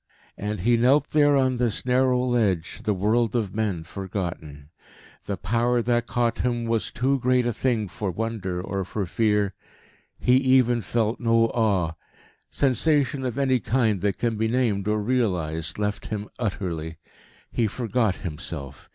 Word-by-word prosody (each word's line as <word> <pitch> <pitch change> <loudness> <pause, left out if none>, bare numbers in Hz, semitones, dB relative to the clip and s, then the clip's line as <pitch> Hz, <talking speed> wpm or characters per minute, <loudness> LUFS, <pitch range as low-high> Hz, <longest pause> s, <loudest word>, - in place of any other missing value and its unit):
And 105 -2 -4
he 120 +4 +3
knelt 135 +5 +3
there 145 -2 +4
on 130 -2 +1
his 120 -3 -1
narrow 125 0 +2
ledge, 105 -9 0
the 105 - +2
world 110 +5 +1
of 105 -5 -1
men 105 -6 -1
forgotten. 85 -6 -6 0.5
The 100 - -3
power 120 +2 +1
that 120 0 +1
caught 120 -1 0
him 120 -1 0
was 115 -1 0
too 135 +2 +1
great 125 0 +2
a 120 - 0
thing 110 -2 0
for 95 +2 -4
wonder 95 -2 -3
or 95 +1 -3
for 100 +2 -3
fear; 105 +1 +1 0.6
he 125 +1 +4
even 130 -3 +3
felt 110 +2 -1
no 115 -1 +3
awe. 100 -8 +1 0.6
Sensation 140 0 +1
of 125 -1 -3
any 130 -2 +2
kind 110 -6 +1
that 100 0 0
can 115 -2 -1
be 110 +1 +1
named 110 -5 0
or 105 0 +1
realised 90 -9 -1
left 105 0 -2
him 105 -1 -4
utterly. 85 -7 -3 0.5
He 115 - +1
forgot 110 -2 0
himself. 75 -4 -6
110 Hz, 155 wpm, -25 LUFS, 95-125 Hz, 0.6 s, there